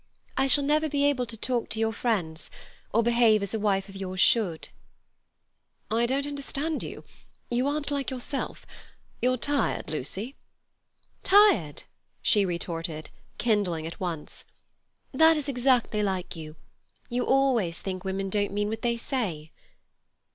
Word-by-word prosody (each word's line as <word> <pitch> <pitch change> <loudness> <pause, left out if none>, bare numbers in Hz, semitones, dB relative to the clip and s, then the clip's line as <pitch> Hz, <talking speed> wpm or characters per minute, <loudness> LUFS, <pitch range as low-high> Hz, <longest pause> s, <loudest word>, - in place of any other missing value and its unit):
I 270 - +2
shall 285 +2 +4
never 305 +2 +2
be 285 0 +1
able 260 -4 +1
to 225 - -7
talk 240 +1 -1
to 220 - -2
your 225 0 +1
friends, 185 -10 -2 0.4
or 230 +2 +3
behave 235 -3 +4
as 200 - -4
a 220 - 0
wife 195 -2 +1
of 195 - -12
yours 185 -1 -5
should." 180 -6 +2 1.2
"I 230 +2 +2
don't 275 +3 0
understand 290 +2 -3
you. - - -7 0.5
You 245 +3 +1
aren't 290 0 -2
like 280 -2 -1
yourself. 265 +1 -4 0.6
You're 255 +1 +2
tired, 280 - -1
Lucy." 190 - -4 0.9
"Tired!" 385 - +4 0.4
she 205 -3 +3
retorted, 165 -3 -4 0.3
kindling 200 -8 +1
at 165 - -7
once. 170 -5 -5 0.7
"That 320 +3 +5
is 295 -1 -3
exactly 250 -4 +2
like 190 -4 -2
you. 155 -1 -8 0.5
You 245 0 -1
always 250 -11 +2
think 185 -1 -5
women 195 0 -2
don't 205 -1 +1
mean 205 0 0
what 220 +1 -4
they 235 -1 0
say." 190 - -3
225 Hz, 145 wpm, -27 LUFS, 190-270 Hz, 1.2 s, That